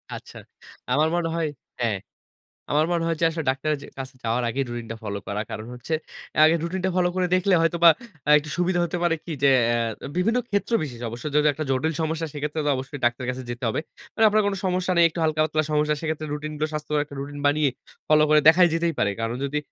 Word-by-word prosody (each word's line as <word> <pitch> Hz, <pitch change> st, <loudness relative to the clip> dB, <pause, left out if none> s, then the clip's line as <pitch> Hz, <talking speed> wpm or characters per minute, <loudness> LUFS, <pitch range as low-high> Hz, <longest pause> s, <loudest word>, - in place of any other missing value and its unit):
আচ্ছা। -, -, -11 dB, 0.5 s
আমার 150 Hz, +5 st, +3 dB
মনে 170 Hz, -1 st, 0 dB
হয় 165 Hz, -2 st, 0 dB, 0.3 s
হ্যাঁ। 110 Hz, -4 st, +1 dB, 0.7 s
আমার 150 Hz, +2 st, +3 dB
মনে 170 Hz, -1 st, +1 dB
হয় 165 Hz, -, 0 dB
যে -, -, +4 dB
আসলে 160 Hz, 0 st, -4 dB
ডাক্তারের 145 Hz, +3 st, 0 dB
যে -, -, -10 dB
কাছে 130 Hz, 0 st, -7 dB
যাওয়ার 115 Hz, +2 st, 0 dB
আগেই 135 Hz, +4 st, -1 dB
রুটিন 120 Hz, -1 st, -5 dB
টা -, -, -4 dB
ফলো 100 Hz, -1 st, -3 dB
করা। 100 Hz, +1 st, -2 dB
কারণ 110 Hz, -, -6 dB
হচ্ছে 125 Hz, +6 st, -5 dB, 0.4 s
আ -, -, +3 dB
আগে 160 Hz, +1 st, +5 dB
রুটিন 180 Hz, +2 st, -3 dB
টা -, -, +2 dB
ফলো 180 Hz, -1 st, +3 dB
করে 185 Hz, -1 st, +1 dB
দেখলে 185 Hz, +1 st, +2 dB
হয়তোবা 170 Hz, 0 st, +5 dB, 0.4 s
আ -, -, +1 dB
একটু 150 Hz, +1 st, -4 dB
সুবিধা 175 Hz, 0 st, +1 dB
হতে 175 Hz, +1 st, -3 dB
পারে 170 Hz, -1 st, +2 dB
কি 170 Hz, -, -6 dB
যে 140 Hz, -, +7 dB, 0.2 s
অ্যা 115 Hz, -2 st, -1 dB
বিভিন্ন 225 Hz, +7 st, +2 dB
ক্ষেত্র 200 Hz, +3 st, -1 dB
বিশেষে 120 Hz, -5 st, -6 dB
অবশ্য। 120 Hz, +4 st, -8 dB
যদি 150 Hz, 0 st, +4 dB
একটা 155 Hz, +3 st, -4 dB
জটিল 135 Hz, +5 st, +1 dB
সমস্যা 160 Hz, +1 st, -2 dB
সেক্ষেত্রে 150 Hz, +1 st, -3 dB
তো -, -, +2 dB
অবশ্যই 135 Hz, +2 st, -6 dB
ডাক্তারের 120 Hz, +1 st, 0 dB
কাছে 130 Hz, +1 st, -7 dB
যেতে 120 Hz, +2 st, -6 dB
হবে। 110 Hz, -, -1 dB, 0.3 s
মানে 225 Hz, -, +4 dB
আপনার 215 Hz, +1 st, +3 dB
কোন 200 Hz, -, 0 dB
সমস্যা 185 Hz, 0 st, 0 dB
নেই, 170 Hz, -, +6 dB
একটু 165 Hz, -, -7 dB
হালকা-পাতলা 155 Hz, 0 st, +1 dB
সমস্যা। 150 Hz, 0 st, +2 dB
সেক্ষেত্রে 155 Hz, -1 st, -3 dB
রুটিনগুলো 150 Hz, +1 st, -3 dB
স্বাস্থ্যকর 150 Hz, 0 st, -1 dB
একটা 145 Hz, -, -11 dB
রুটিন 145 Hz, +1 st, -6 dB
বানিয়ে 145 Hz, 0 st, +3 dB, 0.4 s
ফলো 155 Hz, 0 st, +5 dB
করে 155 Hz, 0 st, +6 dB
দেখাই 175 Hz, +2 st, +7 dB
যেতেই 165 Hz, 0 st, +1 dB
পারে। 100 Hz, -, +2 dB
কারণ 115 Hz, +1 st, -2 dB
যদি 140 Hz, +2 st, -2 dB
155 Hz, 220 wpm, -24 LUFS, 130-165 Hz, 0.7 s, যে